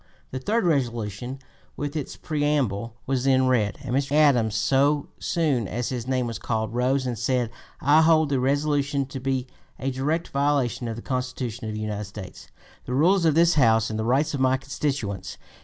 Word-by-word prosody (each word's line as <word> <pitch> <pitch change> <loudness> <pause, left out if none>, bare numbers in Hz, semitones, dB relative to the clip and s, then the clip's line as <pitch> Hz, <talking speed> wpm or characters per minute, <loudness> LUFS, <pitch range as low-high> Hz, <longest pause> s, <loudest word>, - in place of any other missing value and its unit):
The 130 - -3
third 210 - 0
resolution 120 - -1 0.4
with 145 +1 -4
its 150 -4 -4
preamble 140 -8 -1
was 135 -1 -1
then 130 -1 +4
read, 115 -5 +1
and 130 -1 -2
Mr. 140 +1 0
Adams, 130 -8 +4
so 140 +6 +2
soon 145 - 0
as 120 +4 -3
his 125 -2 -4
name 130 -1 0
was 115 -1 -4
called, 110 -1 -2
rose 130 +2 +1
and 120 -4 -3
said: 120 -1 0 0.3
"I 145 +3 +5
hold 160 -2 +4
the 135 -2 +1
resolution 140 +1 +1
to 130 0 -7
be 130 -1 -1 0.3
a 135 +1 -2
direct 150 +6 -1
violation 140 -4 0
of 115 - -3
the 115 - -8
Constitution 125 -3 -3
of 110 - -4
the 110 - -4
United 105 -1 -3
States, 100 -1 -10 0.4
the 125 - -3
rules 175 +5 +4
of 155 -2 +3
this 170 +1 +5
House, 115 -6 +3
and 110 - -3
the - - 0
rights 135 +7 +1
of 140 - -2
my 130 0 +3
constituents." 130 - -3
130 Hz, 190 wpm, -25 LUFS, 115-145 Hz, 0.4 s, I